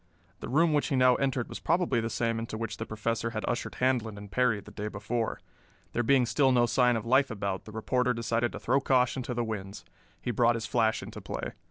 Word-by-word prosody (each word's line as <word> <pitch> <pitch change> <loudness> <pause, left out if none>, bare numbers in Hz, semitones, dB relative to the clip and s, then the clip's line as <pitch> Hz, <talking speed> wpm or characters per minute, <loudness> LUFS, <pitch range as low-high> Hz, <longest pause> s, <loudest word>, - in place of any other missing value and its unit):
The - - -7
room 160 +5 +3
which 145 - +2
he 140 - 0
now 130 -1 +5
entered 130 -3 0
was - - -7
probably 165 -8 +1
the 115 - -2
same 115 -1 -1
into 115 -1 -5
which 115 -1 -4
the - - -5
Professor 115 +1 -2
had 110 -1 -4
ushered 120 - -2
Handlon 120 -5 0
and 100 -1 -10
Perry 125 -3 +2
the 105 - -13
day 105 +1 -5
before. 110 +2 -3 0.5
There 120 - +1
being 130 +1 +4
still 130 +3 +3
no 120 -1 +4
sign 125 0 +3
of 110 0 -3
life 130 +3 +4
about, 100 -4 -3
the 110 - -10
reporter 125 +3 0
decided 115 0 0
to - - -6
throw 135 +3 +1
caution 130 0 +2
to 125 0 -4
the 120 - 0
winds. 100 -3 -6 0.3
He 120 - -2
brought 120 +1 +3
his 115 -1 -3
flash 110 0 +1
into - - -8
play. - - -5
120 Hz, 230 wpm, -29 LUFS, 110-125 Hz, 0.5 s, now